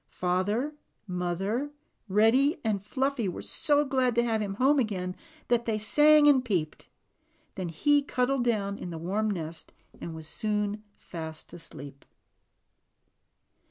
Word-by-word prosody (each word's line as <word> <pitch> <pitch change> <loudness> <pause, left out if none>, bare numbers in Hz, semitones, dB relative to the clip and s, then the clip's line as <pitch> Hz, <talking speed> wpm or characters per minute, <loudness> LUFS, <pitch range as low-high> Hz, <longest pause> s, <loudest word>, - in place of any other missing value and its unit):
Father, 205 +10 -1 0.3
mother, 190 +8 -2 0.4
Reddy, 235 - +3
and 210 -3 0
Fluffy 260 -1 -1
were 180 - -6
so 295 0 +2
glad 255 -3 +1
to 235 - +3
have 225 -2 0
him 200 -2 -3
home 275 +6 +3
again 185 -6 -2 0.3
that 235 -1 +1
they 220 -2 +1
sang 295 +7 +5
and 270 -3 +5
peeped. 175 -10 -2 0.7
He 185 - +1
then - - -10
cuddled 250 +1 +1
down 205 -4 -1
in 180 - -6
the 165 - -6
warm 200 +6 -1
nest 165 -4 -5 0.3
and 165 - -6
was 160 -1 -8
soon 210 +2 -2 0.2
fast 160 -2 -8
asleep. 140 -4 -10
215 Hz, 135 wpm, -28 LUFS, 180-255 Hz, 0.7 s, sang